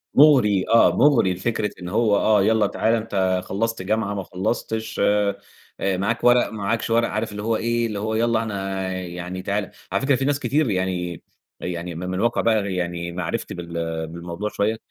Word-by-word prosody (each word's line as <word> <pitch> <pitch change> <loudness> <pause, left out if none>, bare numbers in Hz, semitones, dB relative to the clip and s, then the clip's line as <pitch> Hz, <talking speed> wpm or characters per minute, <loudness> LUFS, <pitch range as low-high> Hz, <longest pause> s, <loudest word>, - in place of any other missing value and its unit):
مغري 125 -10 +5
آه 115 0 +5
مغري، 120 -10 +4
فكرة 105 +2 -1
إن 90 - -5
هو 110 0 +2
آه 105 -2 +3
يالّا 110 0 +3
تعالَ، 110 +2 +1
أنت 95 -5 0
خلصت 115 +1 -2
الجامعة 105 +1 -1
ما 100 - -3
خلصتش، 110 +3 -3
آآ، 105 -1 +2 0.6
معاك 110 +5 -1
ورق 120 0 +5
معاكش 110 +2 -2
ورق، 115 +1 +3
عارف 110 0 -2
اللي 105 0 -6
هو 115 +1 +1
إيه 115 +1 0
اللي 105 -2 -4
هو 110 +1 -2
يالّا 115 0 +2
أنا 95 -3 -3
يعني 90 0 -5
تعالَ، 100 +1 -2 0.2
على 100 - 0
فكرة 135 0 +3
في 135 +1 -1
ناس 145 0 +1
كتير 145 -2 +1
يعني 90 -3 -2 0.4
يعني 85 -1 -5
م - - -6
م 90 - -4
من 95 0 -2
واقع 120 +3 +1
بقى 105 -4 +1
يعني 85 -1 -3
معرفتي 85 -1 -3
بال 85 -2 -4
بالموضوع 85 +5 -5
شويّة، 110 +2 0
105 Hz, 185 wpm, -23 LUFS, 90-115 Hz, 0.6 s, مغري